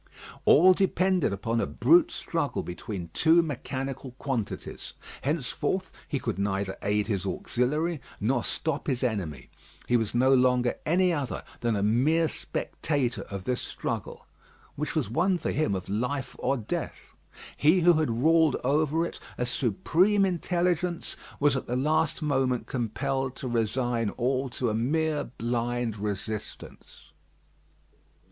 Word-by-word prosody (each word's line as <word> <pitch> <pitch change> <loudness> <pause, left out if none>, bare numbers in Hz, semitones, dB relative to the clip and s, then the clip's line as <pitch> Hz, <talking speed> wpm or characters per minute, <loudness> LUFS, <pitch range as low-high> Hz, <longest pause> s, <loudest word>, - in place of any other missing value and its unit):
All 185 +5 +7
depended 185 - +2
upon 115 +4 -1
a - - -1
brute 340 0 +4
struggle 165 - -2
between 90 -1 -6
two 165 +1 +5
mechanical 135 -3 -4
quantities. 130 -7 -4 0.3
Henceforth 165 +6 -1 0.2
he 145 - -1
could 115 -6 -3
neither 100 -1 -1
aid 105 +1 +1
his 100 -5 -1
auxiliary, 150 +5 -1 0.2
nor 120 +2 +1
stop 160 - -2
his 130 -3 0
enemy. 90 - -3 0.4
He 120 - +4
was 115 -1 -2
no 130 +2 +5
longer 125 -1 +3
any 180 +2 +3
other 145 -5 -3 0.2
than 115 -2 0
a 100 - 0
mere 145 +10 +3
spectator 140 -5 -2
of 100 -2 -5
this 125 +3 -1
struggle, - - -5 0.5
which 150 +3 -3
was 155 -8 +1
one 175 - +2
for - - -2
him 125 -10 +1
of 95 -1 -5
life 125 +7 -2
or 135 +2 +1
death. 110 - -5 0.4
He 160 +5 +4
who 175 +1 +6
had 155 - +1
ruled 160 -2 +5
over 155 +4 +2
it, - - -7 0.2
a 125 - 0
supreme 165 - +2
intelligence, 175 -1 -1 0.2
was 145 -1 +3
at 130 - -3
the 125 - -1
last 155 +4 +1
moment 130 -4 +1
compelled 130 +2 -2
to 130 - -5
resign 120 0 0
all 130 +4 -1
to 120 -1 -1
a - - -2
mere 150 +6 0
blind 120 -1 -2
resistance. 105 +1 -6
130 Hz, 140 wpm, -27 LUFS, 115-160 Hz, 0.5 s, All